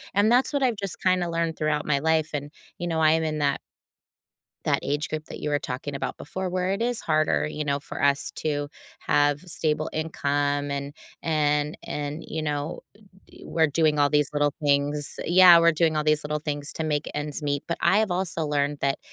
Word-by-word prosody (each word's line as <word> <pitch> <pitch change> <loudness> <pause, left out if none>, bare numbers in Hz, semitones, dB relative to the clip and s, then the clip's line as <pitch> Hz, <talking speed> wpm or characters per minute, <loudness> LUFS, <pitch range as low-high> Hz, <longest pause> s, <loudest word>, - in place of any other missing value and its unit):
And 210 +3 +4
that's 250 +4 +3
what 280 -1 +1
I've 245 -3 +2
just 195 -2 -5
kinda 185 -2 +2
learned 165 -1 -1
throughout 150 -1 0
my 140 -2 +2
life, 160 0 +1
and, 145 0 -4 0.3
you 175 - -3
know, 165 -1 -1
I 155 0 +5
am 160 0 +1
in 155 -1 -2
that 140 -1 +1 1.0
that - - +2
age 150 +2 -2
group 155 0 -4
that - - -9
you 150 - -2
were 145 - +2
talking 140 +2 -5
about 140 - -4
before, 185 +4 -5
where 185 +1 -1
it 200 +3 -1
is 240 -1 0
harder, 155 -1 +1
you 150 0 -4
know, 140 0 0
for - - -7
us 140 0 +3
to 145 -2 -2 0.3
have 145 0 +2
stable 155 -3 -1
income, 145 -2 -1
and 140 +1 -4 0.3
and 150 -1 +1
and 150 +2 -4
you 160 - -4
know, 150 +1 -3 0.2
uh, - - -23 0.3
d - - -16
we're 160 -1 +2
doing 155 0 +1
all 145 0 +4
these 150 -1 +2
little 145 -1 +1
things 145 0 +1
Yeah, 175 0 +8
we're 170 0 +5
doing 160 -1 +1
all 150 - 0
these 155 -1 +2
little 150 0 -2
things 145 -1 -3
to 160 - -3
make 150 -1 -1
ends 150 0 -3
meet, 145 -1 -1
but 170 - -1
I 200 - +4
have 215 -3 +1
also 175 -3 -1
learned 145 0 0
that 140 0 0
150 Hz, 215 wpm, -25 LUFS, 145-165 Hz, 1.0 s, Yeah